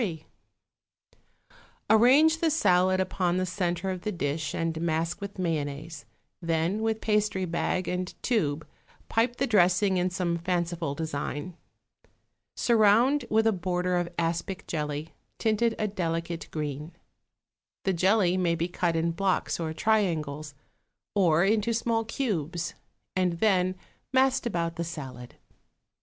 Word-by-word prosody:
3.= 165 -8 -3 1.6
Arrange 275 +9 +5
the 330 - +2
salad 185 - +3
upon 185 -1 0
the 185 - +1
centre 180 0 -1
of 185 -1 -5
the 215 - -2
dish 155 -3 -2
and 165 -1 -2
mask 165 +3 -1
with 200 0 -6
mayonnaise; 155 -2 -3 0.4
then 165 +5 0
with 220 0 -1
pastry 210 -3 +1
bag 175 +2 -1
and 180 0 -3
tube 160 - 0 0.4
pipe 235 +2 +1
the 270 - 0
dressing 190 -3 +3
in 180 +1 +1
some 175 -2 -1
fanciful 170 -4 -1
design. 155 +2 -4 1.0
Surround 235 +5 +4
with 220 +1 +3
a 225 - +5
border 180 -1 -1
of 175 -1 0
aspic 170 +3 -2
jelly, 150 0 -3 0.3
tinted 225 +1 +1
a 215 - 0
delicate 170 -3 -3
green. 150 +1 -4 0.9
The 190 - +1
jelly 185 +1 +3
may 175 -2 +1
be 170 +1 -1
cut 175 -1 -1
in 165 +1 +1
blocks 185 +2 0
or 160 -2 -2
triangles, 155 -7 0 0.6
or 175 -3 +4
into 215 +2 +2
small 225 -1 0
cubes, 175 - -2 0.4
and 185 -2 +2
then 185 0 +2 0.4
massed 260 -1 +3
about 170 -5 -2
the 170 - -1
salad. 135 -7 -8
180 Hz, 130 wpm, -27 LUFS, 165-210 Hz, 1.6 s, Arrange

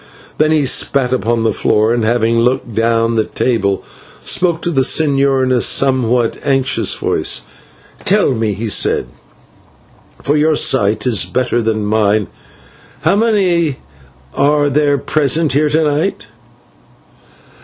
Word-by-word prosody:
Then 155 0 +2
he 155 -3 +2
spat 130 0 +1
upon 120 -2 -1
the 110 - +1
floor 110 +2 +1
and, 120 -1 -1
having 115 0 +1
looked 120 -1 -1
down 115 +1 +1
the 110 -1 +1
table, 100 -7 -1 0.4
spoke 170 -2 0
to 175 - -1
the 135 -5 +1
señor 135 -1 +2
in 130 - 0
a 125 -2 +2
somewhat 125 -3 +1
anxious 135 -2 0
voice. - - -2 0.6
"Tell 205 -5 +2
me," 110 -3 -1
he 110 +4 -5
said, 105 - +1 1.1
"for 145 - -1
your 155 +1 +2
sight 110 -6 +1
is 120 -5 +1
better 125 -1 -1
than 110 -2 -1
mine, 105 -1 +1 0.7
how - - +2
many 185 - +1 0.6
are 145 +1 +2
there 145 0 +2
present 150 +2 0
here 150 +2 +2
to 160 +2 +1
night?" 150 - -1
130 Hz, 135 wpm, -15 LUFS, 115-150 Hz, 1.1 s, Then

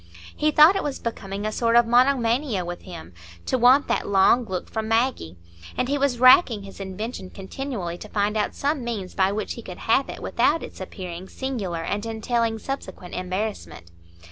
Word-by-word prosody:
He 305 - +1
thought 305 +5 +7
it - - 0
was 285 -2 -3
becoming 200 -3 -5
a 215 - -1
sort 230 +1 +1
of 240 0 +6
monomania 240 -3 +2
with 175 0 -6
him, 165 - -10 0.3
to - - 0
want 255 +3 +5
that - - -1
long 200 +5 +4
look 185 -3 -4
from 220 -1 -4
Maggie; 225 - 0 0.4
and 250 - 0
he 280 - 0
was 275 -3 +1
racking 255 - +6
his 195 0 -11
invention 195 +1 -6
continually 195 -4 -6
to 215 - -10
find 205 +1 0
out 210 -1 -1
some 285 -1 -1
means 215 -6 -4
by 190 0 +2
which 210 +1 -3
he 235 - -8
could 185 -5 -9
have 260 +5 +1
it - - -7
without 330 - +1
its - - -10
appearing 185 -1 -7
singular 205 -11 -4
and 205 +5 -3
entailing 225 0 -1
subsequent 200 -8 -7
embarrassment. 185 - -4
220 Hz, 185 wpm, -24 LUFS, 190-250 Hz, 0.4 s, thought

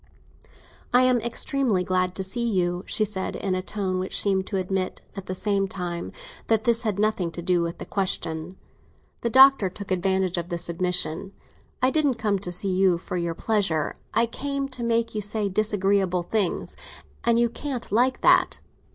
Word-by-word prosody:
"I 250 +1 +5
am 255 -2 +3
extremely 235 -3 0
glad 185 0 0
to 190 - -3
see 235 +6 -2
you," 180 -6 0
she 215 - +1
said, 195 -2 -3
in 195 - -2
a 185 - 0
tone 190 -1 -2
which 185 - -1
seemed 190 -2 +1
to 195 - -2
admit, 185 0 -2
at 195 -1 -7
the 185 - -3
same 200 0 0
time, 175 -2 -4 0.4
that 220 -1 +2
this 230 0 +3
had 215 -5 -1
nothing 210 -4 +1
to 175 - -5
do 175 0 +2
with 170 0 -3
the - - -7
question. 180 -2 -3 0.6
The 235 - 0
Doctor 265 -5 +7
took 195 +1 -9
advantage 185 -1 +1
of 170 +1 -6
this 175 -1 -3
admission. 180 +1 -1 0.5
"I 255 - +4
didn't 290 -4 +2
come 210 -3 0
to 180 -2 -3
see 190 +2 +1
you 185 -2 +3
for 170 - -6
your 170 -1 -2
pleasure; 190 -9 0 0.2
I 230 - +3
came 275 +3 -3
to 255 -2 -7
make 230 0 0
you 215 - -2
say 210 +1 -1
disagreeable 195 -3 +1
things—and 220 +4 -2
you 235 0 +3
can't 255 0 -5
like 250 +4 +2
that. - - +4
195 Hz, 180 wpm, -25 LUFS, 180-230 Hz, 0.6 s, Doctor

